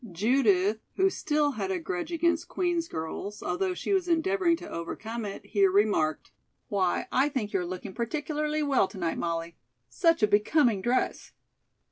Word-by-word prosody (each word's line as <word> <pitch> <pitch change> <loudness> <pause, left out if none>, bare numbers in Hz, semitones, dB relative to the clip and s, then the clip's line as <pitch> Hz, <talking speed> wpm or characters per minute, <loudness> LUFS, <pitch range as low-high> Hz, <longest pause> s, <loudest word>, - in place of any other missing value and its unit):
Judith, 210 0 +2 0.2
who 385 0 +3
still 295 -3 +1
had 200 -7 -3
a 190 - 0
grudge 180 - -4
against 340 -1 +1
Queen's 345 -2 -1
girls, 160 - -5
although 180 +1 -1
she 400 - -2
was 375 -2 +1
endeavoring 345 +1 +2
to - - -9
overcome 220 +7 -5
it, 200 - -7
here 200 -3 +3
remarked: 185 -6 +1 0.4
"Why, 190 -3 +1
I 270 +3 +3
think 245 -8 -3
you 195 - +2
are 180 - -2
looking 185 +1 -6
particularly 300 - -2
well 275 -8 +3
to 200 - -12
night, 170 -3 -2
Molly. 170 0 -3 0.3
Such 330 - +2
a - - +6
becoming 210 +1 +3
dress!" 245 +5 -1
220 Hz, 165 wpm, -28 LUFS, 185-305 Hz, 0.4 s, a